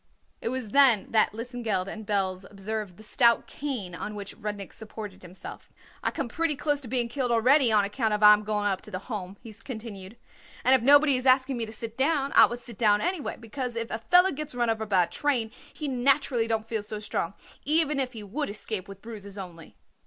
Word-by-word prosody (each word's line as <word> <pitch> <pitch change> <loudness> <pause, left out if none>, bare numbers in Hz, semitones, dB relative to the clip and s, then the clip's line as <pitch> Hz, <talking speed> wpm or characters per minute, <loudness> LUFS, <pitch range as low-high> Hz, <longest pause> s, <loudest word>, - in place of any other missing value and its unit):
It - - -2
was 255 -3 -4
then 255 -7 +5
that 220 -1 +3
Lesengeld 230 -4 -3
and 215 +1 -8
Belz 190 -2 -1
observed 205 -2 -5
the 215 - -12
stout 235 +1 +3
cane 250 -11 -5
on 210 +4 -6
which 200 -1 -7
Rudnik 205 -3 -6
supported 210 -3 -9
himself. 180 +1 -11 0.3
"I - - 0
come 275 - -3
pretty 325 +5 0
close 290 +1 0
to 260 - -7
being 240 0 +1
killed 250 +1 -2
already 245 +2 +4
on 210 -2 +4
account 220 +2 -1
I 210 0 +7
am 210 0 +1
going 210 -1 -1
up 195 -2 0
to - - -11
the 185 - -4 0.2
Home," 195 -1 -5
he 225 - -10
continued; 220 -3 -9 0.5
"and 260 - +5
if 260 - +5
nobody 285 +2 +6
is 255 +1 -2
asking 260 0 +4
me 230 -1 -2
to - - -8
sit 225 +2 -6
down 280 -1 +2
I - - +8
would 240 - -5
sit 235 -4 -11
down 210 -2 +4
anyway, 350 - -2
because 245 +1 -5
if 230 0 -4
a 220 - -2
feller 360 +10 +5
gets 300 -2 -6
run 240 -2 +1
over 220 -1 -3
by 190 -3 +4
a - - -3
train 240 +2 0 0.2
he 300 - -5
naturally 265 -2 +2
don't 220 -1 -1
feel 225 -2 -2
so 210 +1 -5
strong, 205 -3 -3 0.3
even 300 -1 +2
if 260 -1 -2
he 220 -2 -7
would 245 +8 -3
escape 205 -1 -3
with 195 0 -12
bruises 205 -3 -8
only." 175 -4 -10
225 Hz, 220 wpm, -27 LUFS, 205-260 Hz, 0.5 s, I